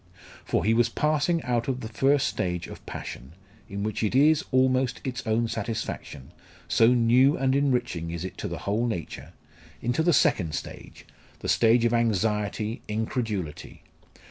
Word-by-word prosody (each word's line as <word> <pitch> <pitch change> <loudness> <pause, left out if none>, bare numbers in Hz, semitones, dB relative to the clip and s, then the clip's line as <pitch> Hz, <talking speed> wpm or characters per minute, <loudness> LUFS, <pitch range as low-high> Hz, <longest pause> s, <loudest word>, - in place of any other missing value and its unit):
For - - -1
he 110 - +4
was 120 +1 +3
passing 155 +5 +1
out 120 -2 -1
of 130 -1 -2
the - - -5
first 135 +5 +2
stage 90 -2 -2
of - - -11
passion, 65 +5 -8 0.4
in 100 +1 -4
which 110 -1 -2
it 110 +2 0
is, 150 +3 +5
almost, 130 -1 +2
its 125 -2 -4
own 115 +1 +1
satisfaction, 110 - -5 0.4
so 115 - +4
new 125 +3 +4
and 130 0 +1
enriching 125 - 0
is 85 +1 -4
it 95 - -7
to - - -3
the - - -5
whole 110 +4 0
nature, 90 -9 -5 0.5
into 120 +6 0
the 175 +2 +3
second 85 - +2
stage - - -8 0.4
the - - -5
stage 115 +1 +4
of 120 - +2
anxiety, 110 -1 0
incredulity. 105 - -4
115 Hz, 160 wpm, -26 LUFS, 105-130 Hz, 0.5 s, is